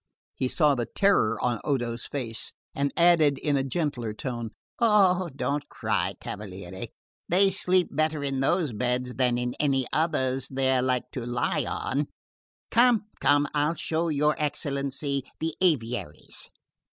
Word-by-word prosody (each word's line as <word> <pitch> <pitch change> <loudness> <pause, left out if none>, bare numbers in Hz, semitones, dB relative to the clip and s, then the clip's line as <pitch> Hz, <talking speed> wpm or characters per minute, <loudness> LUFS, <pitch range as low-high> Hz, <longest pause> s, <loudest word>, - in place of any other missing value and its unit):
He 130 - -1
saw 150 +2 +3
the 120 -3 -2
terror 195 - +2
in 120 -3 +1
Odo's 120 -4 -1
face 115 -6 -3 0.2
and 140 0 0
added 165 -5 +5
in 145 0 0
a 135 - +1
gentler 135 -5 -2
tone: 120 -1 -4 0.3
"Eh, 190 -5 +4
don't 140 +2 -2
cry, - - -1
cavaliere; 95 -2 -7 0.4
they 195 +3 +4
sleep 185 -1 +2
better 155 0 0
in 135 -1 -1
those 150 0 +1
beds 125 +3 -1
than 125 -2 +1
in 125 0 -2
any 135 -3 +2
others 135 -5 +1
they're 130 -1 +1
like 125 -1 -1
to 125 - -5
lie 120 0 0
on. 140 +2 -1 0.6
Come, 235 -3 +4
come, 145 0 +4
and - - -7
I'll 150 +2 +1
show 165 +1 -1
your 150 0 +2
excellency 140 -1 -1 0.2
the 160 0 -2
aviaries." 120 - -1
140 Hz, 145 wpm, -27 LUFS, 125-155 Hz, 0.6 s, added